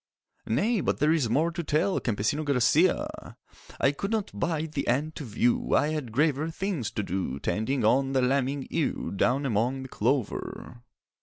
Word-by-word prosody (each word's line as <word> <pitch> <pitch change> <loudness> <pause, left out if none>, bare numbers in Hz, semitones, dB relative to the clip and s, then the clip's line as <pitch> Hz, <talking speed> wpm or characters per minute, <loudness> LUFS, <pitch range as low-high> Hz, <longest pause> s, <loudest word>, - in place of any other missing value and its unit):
'Nay, 200 - +1
but - - 0
there 150 +1 +3
is 150 -8 +2
more 155 +8 +2
to 170 0 -4
tell, 155 +6 +1
Campesino 120 +7 -1
Garcia!' 140 -5 +1 0.4
'I 140 - +4
could 195 +7 -4
not 220 -3 -1
bide 160 -2 -2
the 140 -3 -3
end 145 +6 0
to 155 - -7
view; 120 0 +1
I 145 - +3
had 150 -7 -3
graver 150 +4 +1
things 165 - -2
to 105 - -2
do 90 -8 -3
Tending 110 - -1
on 135 +4 +3
the 130 - +3
lambing 135 +1 0
ewe 160 - -1
Down 125 +8 +1
among 125 +3 0
the 130 - -9
clover. 125 -2 -2
140 Hz, 170 wpm, -27 LUFS, 120-155 Hz, 0.4 s, I